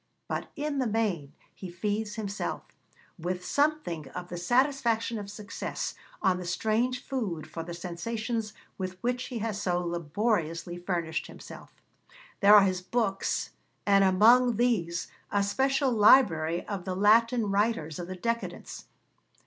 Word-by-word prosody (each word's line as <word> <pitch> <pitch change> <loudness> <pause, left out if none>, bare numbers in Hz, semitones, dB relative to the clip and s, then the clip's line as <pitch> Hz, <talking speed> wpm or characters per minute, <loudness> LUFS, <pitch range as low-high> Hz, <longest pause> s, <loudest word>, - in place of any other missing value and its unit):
But - - -3
in 295 -1 -2
the 255 - +1
main 205 -10 -1 0.2
he 190 - -8
feeds 210 +4 -2
himself, 205 -2 -4 0.6
with 180 +2 -3
something 285 - 0
of 180 0 -7
the 175 - -5
satisfaction 235 +2 +1
of 200 -1 -7
success, 210 +1 -5 0.3
on 190 -2 +3
the - - -5
strange 225 +8 0
food 200 - -3
for 165 +1 -6
the 170 +1 -6
sensations 215 +6 -3 0.3
with 185 -1 -4
which 250 +1 -1
he 250 - -5
has 210 -2 -3
so 175 -1 +1
laboriously 170 0 -1
furnished 170 -3 -2
himself. - - -11 0.7
There 205 0 +8
are 205 - +9
his 185 -2 0
books, 195 0 -1 0.3
and 200 -1 +5
among 230 +6 +5
these 195 -8 0 0.2
a 200 -1 +2
special 265 +6 +1
library 175 -8 +5
of 200 -3 -4
the 185 0 -3
Latin 220 +2 +4
writers 195 -7 0
of 175 - -5
the 185 - -5
Decadence. 230 +5 -4
200 Hz, 140 wpm, -28 LUFS, 175-230 Hz, 0.7 s, are